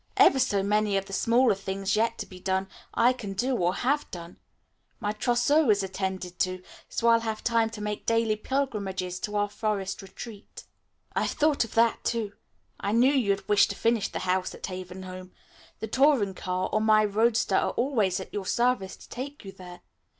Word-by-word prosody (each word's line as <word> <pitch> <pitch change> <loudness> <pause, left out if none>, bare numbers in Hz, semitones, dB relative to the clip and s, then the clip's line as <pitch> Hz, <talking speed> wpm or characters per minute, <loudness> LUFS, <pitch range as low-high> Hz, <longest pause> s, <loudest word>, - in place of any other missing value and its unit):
Ever 270 - +6
so 200 -6 +2
many 210 0 +2
of 195 - -2
the 195 - -10
smaller 235 +4 +3
things 195 +1 -2
yet 225 +2 +1
to - - -4
be 185 - -12
done, 190 +1 -1 0.3
I 240 +2 +4
can 205 -6 -6
do 250 +7 0
or 180 -4 +1
have 285 +4 0
done. 170 -1 -9 0.6
My 205 - -1
trousseau 245 +6 +2
is 205 -2 +4
attended 190 -2 -4
to, 185 0 -1 0.3
so 235 - -1
I'll 230 0 +6
have 220 -1 -4
time 230 -1 +2
to 225 -1 -8
make 210 0 -4
daily 230 -1 +2
pilgrimages 200 -8 -2
to 210 +2 -4
our 205 0 +2
forest 205 -2 -3
retreat." 200 +2 -10 0.5
"I've - - +1
thought 300 -3 +2
of 230 - -9
all 230 - +8
that, 230 - -4
too. 225 -3 -1 0.5
I 200 - -1
knew 250 +5 +5
you'd 200 -8 +1
wish 205 -1 +5
to 200 - -5
finish 230 -1 +1
the - - -6
work 185 0 0
at - - -6
Haven 185 0 -7
Home. 185 0 -9 0.5
The 220 - -3
touring 255 -5 +3
car 185 0 -2
or 215 - +2
my 215 -1 +5
roadster 220 +3 +2
are - - +2
always 225 -8 +1
at 190 - -9
your 195 -2 -4
service 240 -6 +1
to - - -15
take 275 0 -7
you 195 - -7
there. 180 -2 -12
210 Hz, 195 wpm, -27 LUFS, 190-235 Hz, 0.6 s, all